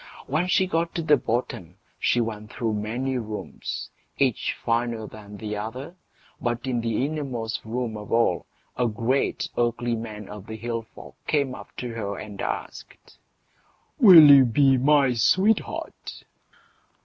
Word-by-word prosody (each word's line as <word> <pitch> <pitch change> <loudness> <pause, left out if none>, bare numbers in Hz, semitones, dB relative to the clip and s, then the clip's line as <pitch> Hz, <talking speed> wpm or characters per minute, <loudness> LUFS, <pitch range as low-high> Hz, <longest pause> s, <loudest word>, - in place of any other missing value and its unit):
When 155 +6 0
she 190 +1 +3
got 165 -2 -1
to 170 - -1
the 150 -2 +5
bottom 110 - -3 0.2
she 120 - +2
went 110 -2 -5
through 115 -2 -2
many 120 +5 -2
rooms, 110 -2 -6 0.3
each 130 -5 +1
finer 115 -1 -1
than 105 -1 -11
the 105 0 -5
other; 125 +10 -6 0.5
but 120 0 -2
in 125 -3 -1
the 115 +2 0
innermost 135 -7 -4
room 115 0 -3
of 105 0 -9
all, 115 -7 +2 0.3
a 125 - +1
great 115 +5 0
ugly 120 0 0
man 105 -2 -7
of 105 -1 -10
the 110 - -6
hill 115 +1 -3
folk 110 - -14
came 140 -4 +1
up - - -12
to 125 - -4
her 105 -4 -4
and 105 -2 -8
asked, - - -7 0.8
"Will 180 - +10
you 140 -1 +9
be 135 +3 +4
my 135 0 +4
sweetheart?" 190 - 0
120 Hz, 150 wpm, -25 LUFS, 110-135 Hz, 0.8 s, Will